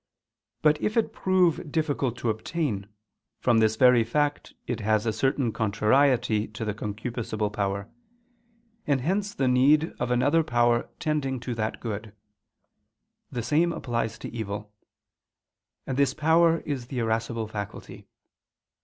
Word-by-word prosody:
But 150 -1 +4
if 215 - -1
it 230 - +1
prove 180 -5 +1
difficult 145 -6 -1
to 120 -1 0
obtain, 110 -3 -3 0.5
from 120 -2 +3
this 110 0 +3
very 125 0 +5
fact 145 +5 -1
it 120 - -3
has 110 0 +1
a 110 - 0
certain 135 +1 0
contrariety 110 +1 +2
to 110 +1 -6
the 105 - -1
concupiscible 110 0 -4
power: 100 0 -2 1.0
and 140 -3 +2
hence 195 +7 0
the 135 - +1
need 140 +5 +4
of 120 - -1
another 135 +7 +3
power 120 -3 +2
tending 140 -4 -1
to 125 0 -3
that 110 -1 -3
good. 110 -2 -6 1.2
The 120 - -3
same 155 +8 +2
applies 115 -8 -2
to - - -7
evil. 105 -2 -5 1.1
And 130 - -3
this 140 -2 +2
power 165 +2 +3
is 135 -5 -4
the 130 - -6
irascible 115 0 -1
faculty. 105 -2 -7
120 Hz, 135 wpm, -26 LUFS, 110-145 Hz, 1.2 s, very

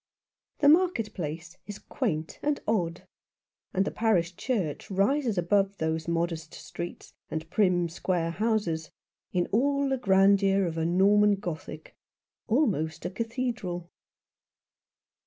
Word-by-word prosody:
The 285 - +5
market 305 - +4
place 165 +1 -6
is 205 -1 -6
quaint 165 - -3
and 295 -1 0
odd, 175 -6 -1 0.6
and 190 +1 +1
the - - -2
parish 180 -6 +1
church 195 - -2
rises 215 +4 +1
above 195 +3 +1
those 160 0 -2
modest 165 -2 -2
streets, 175 0 -8 0.2
and 160 0 -4
prim, 180 -4 +2
square 165 0 -1
houses, 175 -6 -1 0.4
in 175 -1 +1
all 280 +5 +2
the 265 - +1
grandeur 195 -1 +4
of 165 -1 -3
Norman 200 +5 +4
Gothic, 160 -5 -7 0.5
almost 170 - 0
a 175 - -2
cathedral. 225 -6 -3
190 Hz, 120 wpm, -28 LUFS, 165-220 Hz, 0.6 s, The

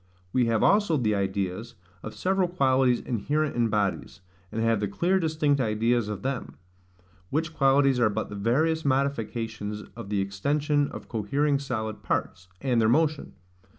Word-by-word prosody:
We 125 -2 +3
have 115 -1 +1
also 200 -6 +4
the 110 -5 +1
ideas 100 +3 -2 0.3
of 110 - -8
several 190 0 +1
qualities 130 -7 +2
inherent 145 +6 -1
in 120 -1 +2
bodies, 100 -2 -2 0.3
and 110 - -3
have 115 -1 +2
the 105 - -1
clear 175 - +1
distinct 155 -4 +1
ideas 115 0 +1
of 100 -2 -5
them; 135 -2 -3 0.7
which 155 +2 -1
qualities 135 -2 +3
are 120 -3 +4
but 110 +1 -3
the 105 - -7
various 155 +10 +1
modifications 115 -6 -2
of 100 - -8
the 105 -1 0
extension 145 +10 0
of - - -9
cohering 140 +7 0
solid 110 -6 -4
parts, 90 0 -2
and 125 -4 +2
their 110 - +3
motion. 155 +3 +1
120 Hz, 155 wpm, -26 LUFS, 105-145 Hz, 0.7 s, also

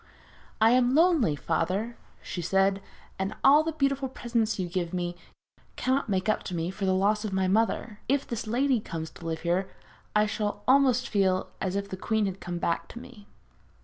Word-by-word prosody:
'I 225 +1 +6
am 250 +1 +3
lonely, 320 - +4
father,' 195 +10 -1 0.3
she 175 - -5
said, 195 +3 +2 0.4
'and 195 +2 -2
all 285 +3 +7
the 325 +1 -2
beautiful 275 -2 0
presents 230 -3 -1
you 185 -2 -2
give 175 0 -3
me 175 -1 -2 0.6
cannot 260 -1 0
make 190 -1 0
up 215 - +1
to 180 - -4
me 165 +2 -2
for 195 +1 -4
the 190 - +2
loss 210 +3 +2
of 215 - -3
my 190 0 +1
mother. 215 +1 0
If 280 +1 +2
this 230 -2 -5
lady 255 +2 +2
comes 160 -6 -6
to 170 - -13
live 160 -1 -3
here 180 +3 0 0.5
I 210 0 +5
shall 210 -1 -3
almost 260 -2 +4
feel 190 -3 +1
as 190 0 -1
if 200 0 -2
the 190 - -6
queen 220 +2 0
had 195 -1 -4
come 175 0 -4
back 170 0 -1
to 235 - -9
me.' 245 -5 -13
210 Hz, 195 wpm, -27 LUFS, 185-245 Hz, 0.6 s, all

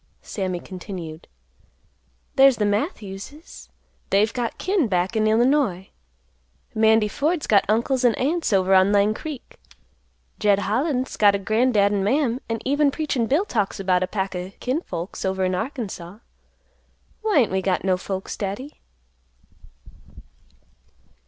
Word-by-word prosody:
Sammy 185 -3 -3
continued, 175 -4 -8 1.1
"There's 270 -1 +6
the 210 - +1
Matthews's, 205 - -4 0.4
they've 210 +3 +2
got 240 -2 -3
kin 370 - +1
back 185 +2 0
in 215 0 +2
Illinois; 225 -4 +2 0.8
Mandy 220 0 +4
Ford's 300 - -1
got 200 -2 +4
uncles 245 +4 +1
and 240 -3 +3
aunts 320 +4 0
over 190 -1 +3
on 190 +1 +5
Lang 205 +1 +3
Creek; 290 +2 -8 0.8
Jed 205 -2 +3
Holland's 255 +6 -1
got 205 -1 +5
a - - +1
grandad 215 0 +2
and 200 -2 0
mam, 255 +2 +1
and 225 -1 -3
even 285 +2 +3
Preachin' 275 -6 -1
Bill 300 - +2
talks 210 - -2
about 185 -2 +1
a 185 - 0
pack 190 -1 -3
o' 180 +1 -5
kin 260 +6 -1
folks 175 - -6
over 190 0 0
in 185 - 0
Arkansaw. 210 - -5 1.0
Why 430 -5 +1
ain't 225 - 0
we 190 0 0
got 185 -1 0
no 190 -1 +2
folks, 190 +1 -5
Daddy?" 210 +9 -6
215 Hz, 140 wpm, -23 LUFS, 190-260 Hz, 1.1 s, There's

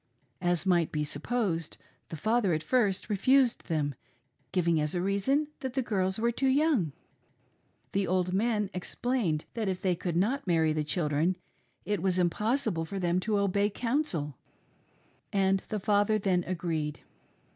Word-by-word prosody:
As 175 0 +1
might 175 -4 +2
be 150 -1 -1
supposed, 165 +2 -2 0.3
the - - -5
father 215 +3 +1
at 155 0 -1
first 210 -7 +1
refused 245 +5 +3
them, 150 -3 0 0.6
giving 170 -3 +2
as 150 +3 -1
a 175 - 0
reason 265 +10 +1
that 260 -2 -5
the 265 - +1
girls 190 -4 0
were 235 +2 +1
too 265 +3 0
young. 265 - +2 1.0
The 195 -1 0
old 180 0 +1
men 210 0 +1
explained 185 -3 -1
that 225 -3 -2
if 185 -1 -2
they 185 -2 +2
could 170 0 -3
not 235 +7 0
marry 160 -3 +3
the 155 0 0
children 155 +3 +1 0.5
it 205 -4 -1
was 185 -1 +1
impossible 210 +1 +1
for 180 +5 -5
them 175 -1 +1
to 210 +2 0
"obey 200 +1 +2
counsel," 210 - -1 0.9
and 195 -1 +2
the 215 - -2
father 205 +2 +2
then 185 -3 +1
agreed. 165 -4 -2
190 Hz, 155 wpm, -29 LUFS, 170-220 Hz, 1.0 s, refused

